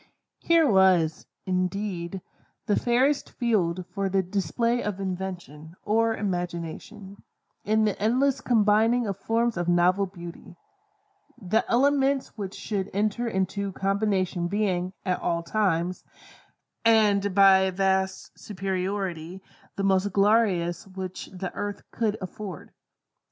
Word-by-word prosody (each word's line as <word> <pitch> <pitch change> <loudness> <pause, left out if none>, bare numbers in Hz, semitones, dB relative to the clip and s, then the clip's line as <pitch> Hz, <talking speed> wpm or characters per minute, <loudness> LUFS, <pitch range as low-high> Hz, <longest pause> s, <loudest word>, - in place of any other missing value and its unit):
Here 335 -1 +4
was, 185 - +3 0.2
indeed, 185 -1 -2 0.4
the 205 - +2
fairest 260 +4 +1
field 185 -7 0
for 195 -1 -1
the 190 0 +1
display 210 +6 -1
of 205 -2 -3
invention, 180 -5 -6
or 225 +1 +1
imagination, 185 +2 -5 0.4
in 215 +1 +2
the 210 -2 -2
endless 260 +5 +2
combining 225 +1 +3
of 200 -2 -4
forms 230 +1 0
of 175 0 -2
novel 180 +3 +3
Beauty; 175 -1 -11 0.8
the 215 +1 +1
elements 275 +1 +2
which 200 -3 -6
should 200 -3 -3
enter 215 +4 0
into 195 -1 -2
combination 195 -3 0
being, 185 -2 -1
at 180 -1 0
all 170 0 -1
times, 180 -2 0 0.8
and 205 -4 +3
by 195 -1 +7
a 190 0 +1
vast 190 0 0
superiority, 190 -2 -4 0.3
the 195 - -3
most 195 +1 +2
glorious 195 -3 +2
which 185 -1 -7
the 185 0 -6
earth 205 -1 -5
could 220 -2 -1
afford. 185 -2 -7
195 Hz, 120 wpm, -26 LUFS, 185-215 Hz, 0.8 s, by